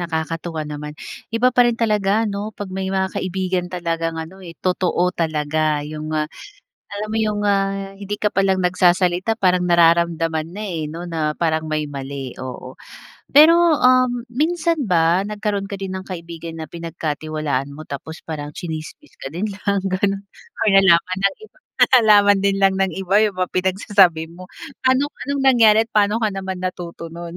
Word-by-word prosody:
nakakatuwa 165 -1 -3
naman. 150 0 -6 0.4
Iba 245 +2 +2
pa 245 - +6
rin 240 -1 +1
talaga 215 -1 +1
'no 205 +1 -4
pag 205 -1 -7
may 190 0 -3
mga 190 0 -1
kaibigan 185 -1 -2
talagang 165 -2 -2
ano, 180 +4 -8
eh, 170 -2 -11
totoo 180 -1 0
talaga 155 -2 -1
yung, 155 0 -6
ah, 155 -1 0 0.7
alam 205 +1 -4
mo 220 - -4
yung, 210 -1 0
ah, 195 0 -1
hindi 205 +1 -6
ka 210 - +2
pa 195 - +3
lang 190 -1 +2
nagsasalita 180 +3 +2
parang 180 -1 +2
nararamdaman 165 -2 +2
na, 205 +4 -6
eh, 160 -5 -4
'no 170 +2 -7
na 160 -3 -1
parang 160 -2 0
may 155 -1 -1
mali, 135 -2 -6
oo. 130 0 -8 0.5
Pero, 330 +2 +6
um, 255 -2 +3
minsan 330 +3 0
ba 170 0 +3
nagkaroon 205 -1 -3
ka 200 - -5
din 195 -1 -5
ng 190 0 -6
kaibigan 170 -2 -7
na 160 - -5
pinagkatiwalaan 155 -3 -3
mo 155 - -9
tapos 160 +3 -8
parang 150 -2 -6
chinismis 165 - -7
ka - - -5
din 170 +8 -4
lang 200 -1 -2
ganun 195 +1 -1 0.4
nalaman 190 -3 +4
ng - - -11
iba, 435 - -19 0.2
'tas - - +4
nalaman 205 -2 +5
din 200 0 +1
lang 195 0 +3
ng 190 -2 +1
iba 195 +2 +2
yung 210 -3 +1
mga 185 -1 -2
pinagsasabi 185 -3 +2
mo. 180 +1 -12 0.4
Anong, 270 +3 +2 0.2
anong 280 -1 -1
nangyari 230 -5 +6
at 225 - -27
paano 210 0 +3
ka 210 - 0
naman 190 -1 -4
natuto 170 -2 -6
nun? 170 0 -8
185 Hz, 170 wpm, -20 LUFS, 165-205 Hz, 0.7 s, pa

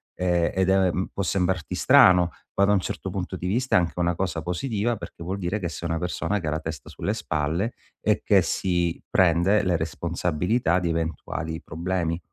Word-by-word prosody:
ehm, 90 -2 +1
ed 95 0 +1
è 95 -1 +4 0.2
può 100 - -2
sembrarti 90 -4 -1
strano 90 -2 +6 0.3
ma 100 - +5
da 100 - +3
un 100 - +3
certo 95 - -4
punto 95 0 -4
di 90 - -4
vista 125 +7 +1
è - - +7
anche 85 -2 -1
una 85 0 +1
cosa 90 -2 -2
positiva 105 +6 -1
perché 85 - -9
vuol 95 +4 -3
dire 95 +3 -2
che 90 - -2
sei 85 +1 -5
una 80 - 0
persona 90 +4 -1
che 85 - -5
ha - - 0
la 80 - -1
testa 80 -5 -7
sulle - - -3
spalle 80 +10 -1 0.3
e - - +1
che - - +5
si 85 -2 0
prende 95 +3 +3
le 90 -2 +1
responsabilità 85 +4 0
di 90 -2 -1
eventuali 80 0 -3
problemi. 85 0 -2
90 Hz, 195 wpm, -25 LUFS, 85-95 Hz, 0.3 s, è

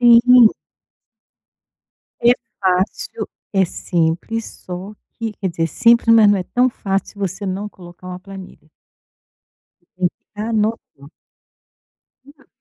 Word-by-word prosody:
Sim. 240 0 +7 1.7
É 240 +1 +6 0.3
fácil, 190 - 0 0.2
é 195 -1 +3
simples, 175 +6 -2
só 185 +3 -8 0.3
que 225 -2 -3
quer 190 - -1
dizer, 165 -1 -1
simples, 230 +5 +4
mas 215 -2 +7
não 205 - +3
é 185 - -2
tão 250 +7 +1
fácil 195 -4 -2
se 205 - -14
você 195 +1 -3
não 195 +3 -3
colocar 180 -1 -13
uma 180 0 -6
planilha. 190 -5 -12 1.1
Você 175 - -38 0.2
tem - - -24 0.2
que 210 - -7
anotar. 215 -10 -2 1.2
Não. 285 +2 -20
200 Hz, 125 wpm, -19 LUFS, 180-230 Hz, 1.7 s, Sim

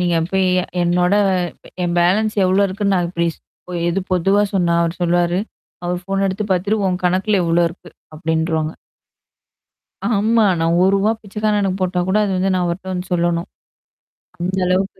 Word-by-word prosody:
நீங்க 175 -1 +1
இப்ப 190 +3 -3 0.5
என்னோட 180 +2 +2 0.7
என் 175 0 -1
பேலன்ஸ் 210 +5 +2
எவ்ளோ 190 +2 +3
இருக்குன்னு 200 +1 0
நான் 175 -1 0
இப்பிடி 170 -1 -1 0.6
எது 185 +3 0
பொதுவா 195 +3 +3
சொன்னா? 175 -3 +2
அவரு 170 0 -1
சொல்லுவாரு? 175 +1 +2 0.5
அவர் 175 0 -2
ஃபோன் 195 +1 -1
எடுத்து 195 +2 -2
பார்த்துட்டு, 200 +4 0
உன் 180 -1 -1
கணக்குல 190 +3 +2
இவ்ளோ 170 +1 +2
இருக்கு 170 - -14 0.3
அப்பிடின்றுவாங்க. 160 0 -1 1.4
ஆமா. 220 +2 +3 0.2
நான் 165 +1 +2
ரூ.1 190 - +4
ரூவா 205 +3 +2
பிச்சைக்காரனுக்கு 205 -2 -1
போட்டா 180 -1 0
கூட 190 - +2
அது 195 - -1
வந்து 190 +1 +1
நான் 180 -1 +1
அவர்ட்ட 185 +2 -4
வந்து 180 +1 -5
சொல்லணும். 170 -1 0 0.9
அந்த 185 +2 -2
அளவுக்கு 190 +1 0
185 Hz, 150 wpm, -19 LUFS, 175-195 Hz, 1.4 s, ரூ.1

